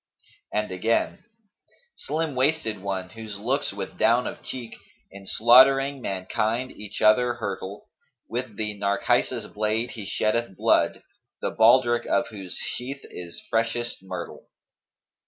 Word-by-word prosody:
And 105 Hz, -2 st, -1 dB
again, 110 Hz, +5 st, 0 dB, 0.7 s
'Slim 155 Hz, 0 st, -2 dB
waisted 130 Hz, -5 st, +1 dB
one, 95 Hz, -1 st, -3 dB
whose 110 Hz, -2 st, -7 dB
looks 130 Hz, +8 st, -1 dB
with -, -, -7 dB
down -, -, +4 dB
of -, -, -5 dB
cheek 120 Hz, -3 st, -7 dB, 0.2 s
* -, -, -39 dB
In 100 Hz, 0 st, -11 dB
slaughtering 135 Hz, +5 st, +6 dB
mankind 110 Hz, +5 st, -1 dB
each 105 Hz, 0 st, -7 dB
other 120 Hz, +3 st, +5 dB
hurtle 100 Hz, -4 st, -5 dB, 0.4 s
With 120 Hz, -2 st, -4 dB
the 105 Hz, -1 st, -2 dB
Narcissus 100 Hz, 0 st, +1 dB
blade 110 Hz, +3 st, -1 dB
he 105 Hz, -4 st, -7 dB
sheddeth 110 Hz, -2 st, 0 dB
blood, -, -, +2 dB, 0.2 s
* -, -, -60 dB
The -, -, 0 dB
baldrick 120 Hz, +1 st, +4 dB
of 115 Hz, 0 st, +1 dB
whose 95 Hz, -5 st, -7 dB
sheath 135 Hz, +3 st, -4 dB
is 85 Hz, -1 st, -8 dB
freshest 115 Hz, +1 st, 0 dB
myrtle.' 95 Hz, -, -7 dB
115 Hz, 135 wpm, -25 LUFS, 100-125 Hz, 0.7 s, slaughtering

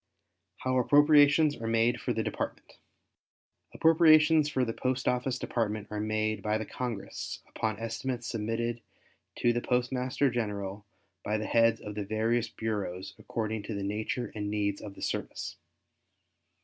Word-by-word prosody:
How 130 Hz, 0 st, 0 dB
Appropriations 145 Hz, +2 st, +5 dB
Are 115 Hz, -, -5 dB
Made 115 Hz, +1 st, +2 dB
for -, -, -1 dB
the -, -, 0 dB
Department -, -, -5 dB, 0.9 s
Appropriations 155 Hz, -2 st, +5 dB
for 130 Hz, -3 st, +1 dB
the 115 Hz, -, -3 dB
Post 130 Hz, +1 st, -1 dB
Office 125 Hz, +1 st, +1 dB
Department 110 Hz, -4 st, -2 dB
are 105 Hz, -, -3 dB
made 110 Hz, 0 st, -1 dB
by 105 Hz, +2 st, 0 dB
the 110 Hz, -, -4 dB
Congress 120 Hz, -5 st, -5 dB
upon 110 Hz, -2 st, -2 dB
estimates 120 Hz, +2 st, -3 dB
submitted 115 Hz, +1 st, -2 dB, 0.5 s
to 120 Hz, -, +2 dB
the 120 Hz, -, -1 dB
Postmaster 125 Hz, +2 st, 0 dB
General 105 Hz, -3 st, -3 dB, 0.4 s
by 105 Hz, +1 st, 0 dB
the 110 Hz, -, -3 dB
heads 115 Hz, 0 st, +3 dB
of 105 Hz, -, -6 dB
the 105 Hz, 0 st, -3 dB
various 110 Hz, +3 st, 0 dB
bureaus 100 Hz, -5 st, -4 dB
according 110 Hz, -1 st, -3 dB
to 105 Hz, +1 st, -5 dB
the 100 Hz, -, -3 dB
nature 110 Hz, +4 st, -2 dB
and 105 Hz, -1 st, -3 dB
needs 100 Hz, -1 st, -1 dB
of 100 Hz, -2 st, -8 dB
the -, -, -9 dB
service. -, -, -4 dB
115 Hz, 150 wpm, -30 LUFS, 105-125 Hz, 0.9 s, Appropriations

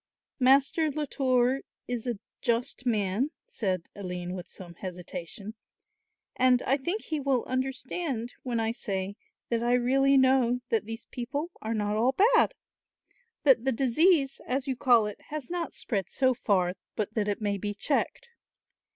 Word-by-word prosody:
"Master 275 Hz, +4 st, +4 dB
Latour 265 Hz, -3 st, +1 dB, 0.3 s
is 245 Hz, 0 st, -3 dB
a 240 Hz, -3 st, -1 dB, 0.2 s
just 245 Hz, +2 st, -1 dB
man," 215 Hz, +3 st, +1 dB, 0.2 s
said 185 Hz, -5 st, -2 dB
Aline 180 Hz, -2 st, -5 dB
with 180 Hz, -1 st, -6 dB
some 175 Hz, -2 st, -10 dB
hesitation, 180 Hz, +3 st, -7 dB, 0.8 s
"and 255 Hz, -1 st, +4 dB
I 270 Hz, -, +3 dB
think 350 Hz, +10 st, -2 dB
he 310 Hz, -2 st, -2 dB
will 270 Hz, -3 st, +1 dB
understand 255 Hz, 0 st, -2 dB
when 240 Hz, -3 st, -2 dB
I 225 Hz, 0 st, +1 dB
say 200 Hz, -4 st, -3 dB, 0.3 s
that 235 Hz, -1 st, +1 dB
I 240 Hz, +1 st, +2 dB
really 270 Hz, +3 st, +4 dB
know 260 Hz, -2 st, +4 dB
that 225 Hz, -3 st, +1 dB
these 225 Hz, +1 st, -7 dB
people 280 Hz, +7 st, -4 dB
are 225 Hz, +1 st, -2 dB
not 210 Hz, 0 st, 0 dB
all 250 Hz, +4 st, +2 dB, 0.2 s
bad, -, -, +4 dB, 0.9 s
that 265 Hz, -5 st, +5 dB
the 265 Hz, -, +2 dB
disease, 275 Hz, +4 st, +3 dB
as 260 Hz, +1 st, 0 dB
you 265 Hz, -2 st, -1 dB
call 245 Hz, -4 st, +4 dB
it, 210 Hz, -1 st, -6 dB
has 305 Hz, 0 st, -5 dB
not 345 Hz, -2 st, -3 dB
spread 195 Hz, -7 st, -2 dB
so 260 Hz, -1 st, +2 dB
far 185 Hz, -6 st, +1 dB, 0.2 s
but 215 Hz, 0 st, -2 dB
that 215 Hz, -2 st, 0 dB
it 205 Hz, -, -1 dB
may 205 Hz, -2 st, -1 dB
be 205 Hz, +1 st, -3 dB
checked." 295 Hz, -, -1 dB
245 Hz, 155 wpm, -28 LUFS, 210-270 Hz, 0.9 s, that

